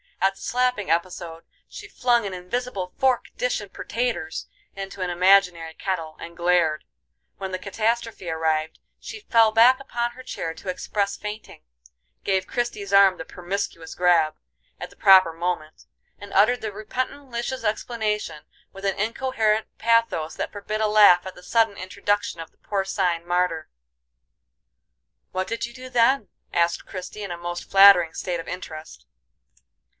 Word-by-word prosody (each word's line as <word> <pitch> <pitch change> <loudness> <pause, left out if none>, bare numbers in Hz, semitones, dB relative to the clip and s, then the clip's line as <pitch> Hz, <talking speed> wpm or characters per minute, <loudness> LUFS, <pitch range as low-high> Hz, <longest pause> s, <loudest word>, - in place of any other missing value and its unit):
At 195 0 +2
the - - -16
slapping 250 -4 0
episode 170 -1 -2 0.2
she - - -10
flung 240 -3 +1
an 195 - -4
invisible 185 +1 -4
"fork, 260 -2 +2
dish, - - 0
and - - -10
pertaters" 230 -9 -3 0.3
into 195 0 -7
an 180 - -1
imaginary 180 -2 +3
kettle, 165 -4 -4
and 170 0 -10
glared; 170 -3 +2 0.5
when 190 -1 -5
the 185 - -3
catastrophe 225 -1 -2
arrived, 160 -1 -1 0.2
she 430 - -8
fell 230 - +4
back 240 +4 +6
upon 240 -3 -3
her 255 +2 -12
chair 165 -9 -5
to 185 - -8
express 200 +2 -2
fainting; 210 +1 -8 0.6
gave 190 -1 0
Christie's 215 -5 -3
arm 195 -2 +6
the 160 - -7
"permiscuous 180 -2 -5
grab" 170 -3 +3 0.4
at - - -6
the - - -19
proper 185 -4 +6
moment, 165 -2 -4 0.3
and 205 0 -11
uttered 215 +6 +4
the 220 - -3
repentant 255 +6 -5
Lisha's 240 +2 -3
explanation 210 -6 -2 0.3
with 195 0 -8
an 195 -1 -1
incoherent 220 -1 0
pathos 230 -9 +1
that - - -4
forbid 210 +1 -4
a 215 - +3
laugh 205 -4 +6
at 190 - -8
the 180 - -14
sudden 225 -2 +2
introduction 200 0 -2
of 165 - -8
the - - -38
porcine 190 -4 -1
martyr. 175 -2 0 1.6
"What 185 0 -2
did 230 - -2
you 235 - -11
do 255 +1 -10
then?" 245 -1 +3 0.2
asked 170 0 +1
Christie 190 +3 -7
in 195 - -5
a 175 - -4
most 175 0 -6
flattering 195 -4 +7
state 175 -2 -3
of 165 - -8
interest. 155 - -8
195 Hz, 155 wpm, -24 LUFS, 175-225 Hz, 1.6 s, flattering